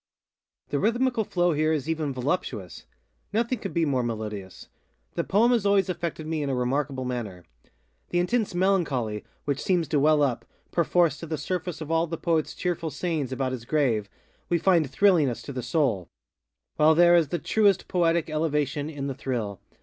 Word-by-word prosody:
The 145 - 0
rhythmical 240 - +1
flow 175 -3 +1
here 155 +1 +1
is 150 -2 -1
even 160 -3 -1
voluptuousŌĆönothing 145 - -4
could 195 - -4
be 170 -2 +1
more 135 -4 +1
melodious. 105 -5 -5 0.5
The - - -1
poem 225 +5 +3
has 235 -4 +2
always 200 -2 +3
affected 170 -3 -3
me 160 -1 -2
in 145 - -2
a 135 - 0
remarkable 130 +1 -1
manner. 110 -8 -5 0.6
The 175 - -1
intense 200 +2 0
melancholy 150 - 0 0.2
which 140 -2 -1
seems 175 -4 +1
to 150 - +2
well 150 +1 +4
up, 125 -4 0 0.3
perforce, 170 -3 +2
to 165 - -7
the 155 0 -2
surface 180 -2 -4
of 155 0 -5
all 165 +1 +2
the 165 +1 -4
poetŌĆÖs 165 -2 -1
cheerful 175 -2 -2
sayings 150 -2 -2
about 130 0 -1
his 125 -3 -5
grave, 120 -7 0 0.4
we 175 - +3
find 170 -4 +3
thrilling 180 -7 +4
us 120 -1 -5
to 140 - -7
the 130 - -3
soulŌĆöwhile 120 - -1
there 175 +1 +6
is 165 -3 +4
the 175 - -2
truest 200 +3 +2
poetic 170 -2 +1
elevation 150 -2 -1
in 145 -3 -5
the 140 - -2
thrill. 120 -7 -4
155 Hz, 175 wpm, -26 LUFS, 130-175 Hz, 0.6 s, there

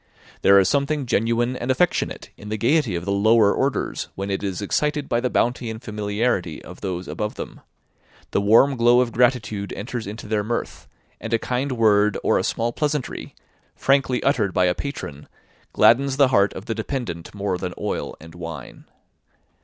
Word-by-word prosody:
There 100 0 +6
is 95 -2 +5
something 140 +3 0
genuine 115 +2 +1
and 125 0 -5
affectionate 165 +7 0
in 105 - -10
the 110 - -2
gaiety 120 - +2
of 85 0 -4
the 100 - -1
lower 105 +1 +4
orders, 135 +1 -1
when 100 +1 -4
it 95 - -1
is 95 -3 -3
excited 150 +8 -1
by 120 - +1
the 125 +1 -1
bounty 120 0 0
and 110 0 -6
familiarity 105 -5 -2
of - - -11
those 90 -1 -4
above 105 0 -4
them; - - -8 0.7
the - - +1
warm 115 +7 +5
glow 120 +1 +5
of 120 -2 -1
gratitude 115 -5 +1
enters 115 0 -5
into 105 +3 -7
their 105 -1 0
mirth, 120 +3 -4 0.3
and 115 +1 -1
a - - +3
kind 130 +4 -2
word 105 -3 +3
or - - +3
a - - -1
small 120 +1 -1
pleasantry, 150 -3 -3 0.4
frankly 135 -2 +1
uttered 100 -6 +1
by 90 - +4
a 90 - +3
patron, 75 - -6 0.4
gladdens 135 +2 +4
the 140 -2 +5
heart 100 -6 +3
of 95 - -8
the 115 - -2
dependant 110 - -5
more 100 -2 -2
than 90 -1 -4
oil - - -3
and 80 +1 -13
wine. 80 -6 -8
110 Hz, 180 wpm, -23 LUFS, 100-125 Hz, 0.7 s, There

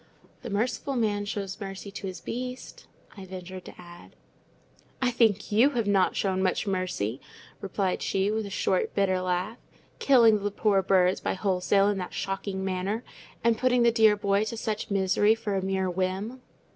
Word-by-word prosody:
"'The 245 - -7
merciful 240 +6 -1
man 210 -4 0
shows 200 0 -5
mercy 195 0 -7
to 195 -1 -6
his 185 - -7
beast,'" 250 +2 -6 0.3
I 195 - -9
ventured 185 0 -8
to - - -12
add. 175 0 -13 0.8
"I 255 -1 +1
think 220 -5 +2
you 230 +7 +5
have 230 - +1
not 195 -2 +2
shown 190 -1 0
much 185 +2 0
mercy," 185 - -2 0.4
replied 195 -1 -1
she, 195 +1 0
with 215 -1 -2
a - - -7
short, 190 -1 0
bitter 190 -2 +2
laugh; 185 +5 -2 0.4
"killing 230 -6 +5
the 205 - -1
poor 205 -1 +2
birds 185 -1 +3
by - - -1
wholesale 195 +1 +2
in 205 -1 0
that 180 - -6
shocking 195 0 -3
manner, 190 +5 -2 0.4
and 230 -1 +2
putting 250 -1 +3
the 235 - +5
dear 220 -2 +5
boy 200 0 +1
to 230 +1 -5
such 220 0 -3
misery 200 +2 +3
for 220 -2 -4
a 195 - 0
mere 190 0 -1
whim." 190 +7 -2
200 Hz, 175 wpm, -27 LUFS, 190-220 Hz, 0.8 s, you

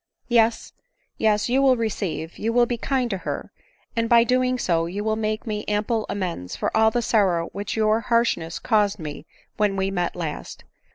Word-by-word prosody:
" - - -42
Yes, 225 0 +1 0.5
yes, 210 -1 +2
you 255 +3 +2
will 265 -2 +4
receive, 190 -8 -3
you 225 - 0
will 240 +1 +4
be 240 - -2
kind 255 +1 0
to 195 - -2
her; - - -5 0.4
and 230 0 0
by 235 -1 +7
so - - -7
doing 255 0 +2 0.3
you 205 +2 -3
will 220 0 0
make 215 0 -2
me 210 -2 -3
ample 210 +2 0
amends 170 - -3
for - - -2
all 220 0 +5
the 240 +2 -1
sorrow 185 -7 +2
which 200 0 -5
your 215 0 +3
harshness 230 -9 0
caused 210 -3 +1
me 150 -5 -7 0.3
when 210 -2 +2
we 195 0 0
met 175 -2 -1
last. 160 -4 -6
215 Hz, 190 wpm, -23 LUFS, 195-230 Hz, 0.5 s, by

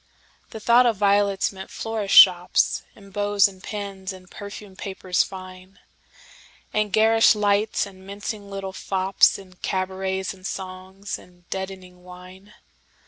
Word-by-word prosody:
The 220 - -8
thought 240 +3 +5
of 225 -4 +1
violets 200 -1 +2
meant 190 -1 -10
florists' 220 -3 -1
shops, 180 -1 +6
And 200 -1 -16
bows 205 0 +3
and 190 -2 -13
pins, 200 -2 -6
and 185 -1 -13
perfumed 200 -1 -10
papers 190 -2 -1
fine; 185 0 -8 1.0
And 210 -1 0
garish 225 +2 +5
lights, 210 +1 +1
and 190 -1 -14
mincing 200 +1 -6
little 195 -1 -6
fopsAnd 190 -1 +1
cabarets 190 0 -2
and 185 0 -8
songs, 190 +1 -6
and 175 -1 -20
deadening 185 -2 -6
wine. 185 +3 -14
195 Hz, 130 wpm, -23 LUFS, 185-205 Hz, 1.0 s, shops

